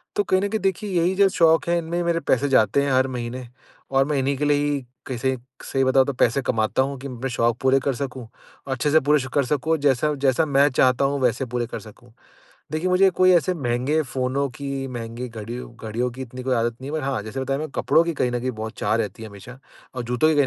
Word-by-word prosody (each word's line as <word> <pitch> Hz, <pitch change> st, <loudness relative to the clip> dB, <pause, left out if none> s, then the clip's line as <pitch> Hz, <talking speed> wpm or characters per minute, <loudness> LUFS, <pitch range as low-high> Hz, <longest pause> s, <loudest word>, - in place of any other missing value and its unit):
तो 205 Hz, -, +2 dB
कहीं 185 Hz, -1 st, +2 dB
न 200 Hz, -, 0 dB
कहीं 220 Hz, -, -1 dB
देखिए 195 Hz, +2 st, -1 dB
यही 175 Hz, +3 st, +2 dB
जो 200 Hz, +1 st, +5 dB
शौक 165 Hz, -3 st, +3 dB
हैं 175 Hz, -, +3 dB
इनमें 170 Hz, +1 st, -3 dB
मेरे 170 Hz, -1 st, +1 dB
पैसे 140 Hz, +2 st, +2 dB
जाते 135 Hz, +2 st, +3 dB
हैं 140 Hz, -, 0 dB
हर 130 Hz, +1 st, +3 dB
महीने। 125 Hz, 0 st, -5 dB, 0.5 s
और 135 Hz, 0 st, +4 dB
मैं 150 Hz, 0 st, -1 dB
इन्हीं 135 Hz, +1 st, 0 dB
के 150 Hz, -, -1 dB
लिए 145 Hz, 0 st, +3 dB
ही 145 Hz, -1 st, 0 dB, 0.3 s
कैसे 130 Hz, +1 st, -1 dB, 0.3 s
सही 135 Hz, -, 0 dB
बताऊँ 130 Hz, 0 st, +4 dB
तो 140 Hz, -, -2 dB
पैसे 125 Hz, +2 st, +2 dB
कमाता 110 Hz, +2 st, +1 dB
हूँ 140 Hz, +1 st, -4 dB
कि 140 Hz, -, -6 dB
मैं 130 Hz, +1 st, -4 dB
शौक 120 Hz, -1 st, +1 dB
पूरे 135 Hz, +1 st, +4 dB
कर 135 Hz, 0 st, -1 dB
सकूँ। 130 Hz, -3 st, -5 dB, 0.4 s
अच्छे 135 Hz, +2 st, -1 dB
से 160 Hz, -, +6 dB
पूरे 150 Hz, +2 st, +3 dB
कर 140 Hz, -2 st, +2 dB
श -, -, -9 dB
सकूँ 155 Hz, +3 st, +1 dB
जैसा 145 Hz, +1 st, +2 dB
जैसा 135 Hz, +4 st, +3 dB
मैं 140 Hz, 0 st, +4 dB
चाहता 130 Hz, +1 st, +3 dB
हूँ 140 Hz, +1 st, 0 dB
वैसे 125 Hz, +1 st, +1 dB
पूरे 120 Hz, 0 st, -2 dB
कर -, -, -6 dB
सकूँ। 115 Hz, +2 st, -15 dB, 0.6 s
देखिए 155 Hz, +4 st, -1 dB
मुझे 185 Hz, +1 st, +5 dB
कोई 185 Hz, +1 st, +4 dB
ऐसे 180 Hz, +1 st, +3 dB
महँगे 135 Hz, +1 st, 0 dB
फ़ोनों 130 Hz, +1 st, -1 dB
की, 135 Hz, +1 st, -5 dB
महँगी 120 Hz, 0 st, -6 dB
घड़ी 115 Hz, +2 st, -6 dB, 0.2 s
घड़ियों 115 Hz, +3 st, -2 dB
की 130 Hz, +3 st, -9 dB
इतनी 125 Hz, 0 st, -9 dB
कोई 130 Hz, -1 st, +1 dB
आदत 115 Hz, 0 st, 0 dB
नहीं 135 Hz, -, -6 dB
है 160 Hz, -, -1 dB
बट -, -, -6 dB
हाँ 135 Hz, -5 st, -1 dB
जैसे 110 Hz, +5 st, -5 dB
बताया 135 Hz, +1 st, -1 dB
मैं 155 Hz, +1 st, -4 dB
कपड़ों 165 Hz, -, +3 dB
की 170 Hz, 0 st, -2 dB
कहीं 125 Hz, -4 st, 0 dB
न 120 Hz, -, -1 dB
कहीं 130 Hz, +1 st, -2 dB
बहुत 110 Hz, -1 st, -6 dB
चाह 110 Hz, -, +1 dB
रहती 110 Hz, 0 st, -3 dB
है 110 Hz, -, -8 dB
हमेशा। 105 Hz, +6 st, -12 dB, 0.4 s
और 125 Hz, -, -3 dB
जूतों 125 Hz, +6 st, +2 dB
की 160 Hz, -, +2 dB
कहीं 145 Hz, -1 st, +4 dB
135 Hz, 250 wpm, -23 LUFS, 125-150 Hz, 0.6 s, से